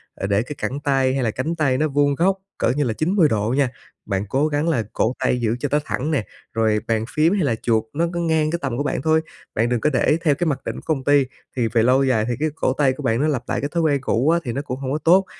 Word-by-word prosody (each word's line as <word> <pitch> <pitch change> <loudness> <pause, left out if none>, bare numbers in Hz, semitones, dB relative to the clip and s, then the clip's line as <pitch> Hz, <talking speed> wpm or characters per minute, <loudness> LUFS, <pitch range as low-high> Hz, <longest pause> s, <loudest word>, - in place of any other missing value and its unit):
ờ, 95 - -3
để 100 +1 +2
cái 135 +5 -6
cẳng 140 - -3
tay 135 -2 +1
hay 135 -1 0
là 115 - +1
cánh 155 +9 -2
tay 140 -5 +1
nó 155 - +1
vuông 145 0 +2
góc 190 +5 +2 0.2
cỡ - - +1
như 145 +4 +1
là 120 -5 -1
90 165 - +2
độ 110 +2 0
nha. 140 -3 +3 0.4
Bạn 100 -1 -2
cố 140 +7 +2
gắng 150 +2 0
là 125 -9 +1
cổ 115 - +1
tay 130 -1 +1
giữ 115 0 +1
cho 145 - -2
nó 150 - +3
thẳng 150 +5 -2
nè, 135 -9 0 0.3
rồi 110 -2 +2
bàn 110 -1 0
phím 160 +4 +3
hay 200 -4 +1
là 120 -6 +1
chuột 110 -1 0
nó 165 +4 +1
cứ 175 - -2
ngang 160 -2 +1
cái 170 - -1
tầm 130 -4 -2
của 145 - 0
bạn 145 - -2
thôi, 160 +2 +3 0.3
bạn 115 +2 +1
đừng 120 -1 +1
có - - +3
để 140 +5 +3
theo 150 -4 +3
cái 175 +4 -1
mặc 135 -3 -1
định - - -3
của - - -8
công 135 -3 -5
ty, 145 0 +4 0.3
thì 120 -3 +1
về 115 0 +2
lâu 130 +3 +4
dài 120 -5 +2
thì 120 - 0
cái 155 +1 +1
cổ 130 - 0
tay 135 -2 +2
của 145 - -8
bạn 115 0 +1
nó 150 - +2
lặp 135 -6 -1
lại - - -1
cái 145 - -2
thói 170 - 0
quen 145 -3 +2
cũ 130 +2 +1
á 170 +1 +3
thì 120 - -3
nó 140 - -2
cũng 130 -3 -5
hông 135 -1 -3
có 145 - 0
tốt, 175 +5 +4
140 Hz, 305 wpm, -21 LUFS, 120-155 Hz, 0.4 s, ty